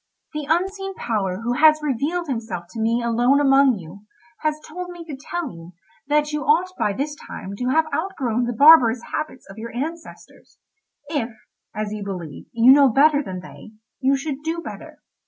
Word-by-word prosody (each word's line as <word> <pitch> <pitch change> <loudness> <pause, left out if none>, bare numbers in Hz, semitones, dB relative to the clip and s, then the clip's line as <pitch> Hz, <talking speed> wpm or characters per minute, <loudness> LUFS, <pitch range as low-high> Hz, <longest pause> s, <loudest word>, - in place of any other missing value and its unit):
"The 300 -1 -4
unseen 385 +3 -1
power 200 -4 -2
who 240 +1 -1
has 310 +3 +5
revealed 300 +6 -1
himself 225 - -4
to 230 - -7
me 230 +2 +1
alone 240 +4 +3
among 270 -3 +4
you, 190 +4 -12 0.3
has 305 -1 -1
told 360 +3 -7
me 345 -1 -9
to 305 -4 -7
tell 305 +1 -5
you 170 +1 -12 0.3
that 300 +1 +1
you 300 - -1
ought 345 +6 +2
by 210 - 0
this 280 +8 -3
time 195 +1 -7
to 250 - -3
have 315 +5 +3
outgrown 260 - -1
the 240 - -2
barbarous 255 -6 +7
habits 305 -4 -4
of 195 +3 -11
your 230 +1 -6
ancestors. 320 +6 -7 0.5
If, 285 -6 -2 0.5
as 215 0 -3
you 210 -1 -5
believe, 180 -7 -7
you 235 +2 +6
know 275 0 +7
better 285 +4 +4
than 185 -9 -6
they, 215 +4 -13 0.3
you 275 +1 +2
should 280 0 -5
do 325 +2 -2
better. - - -9
270 Hz, 180 wpm, -22 LUFS, 225-310 Hz, 0.5 s, barbarous